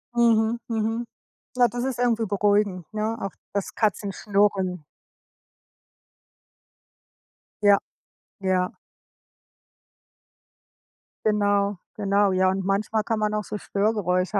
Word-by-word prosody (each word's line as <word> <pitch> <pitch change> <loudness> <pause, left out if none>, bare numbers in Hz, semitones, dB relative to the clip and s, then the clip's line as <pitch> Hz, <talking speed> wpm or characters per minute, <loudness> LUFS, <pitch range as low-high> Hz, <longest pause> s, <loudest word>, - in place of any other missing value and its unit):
Mhm, 230 -1 +3
mhm. 225 +1 -1 0.5
Ja, 245 -1 +5
das 240 +1 -4
ist 260 -2 -2
irgendwie 230 -2 +2
beruhigend, 205 -3 +1
ne, 215 +1 -1
auch 195 - -3 0.2
das 200 -1 -2
Katzenschnurren. 200 -4 0 2.8
Ja, 205 -1 +7 0.6
ja. 185 -1 0 2.5
Genau, 205 -2 +2 0.2
genau. 200 -1 +2
Ja, 185 0 +3
und 190 0 -1
manchmal 210 +2 0
kann 220 +1 -1
man 210 0 0
auch 210 - -1
so 210 - -5
Störgeräusche 200 -2 0
205 Hz, 95 wpm, -25 LUFS, 195-220 Hz, 2.8 s, Ja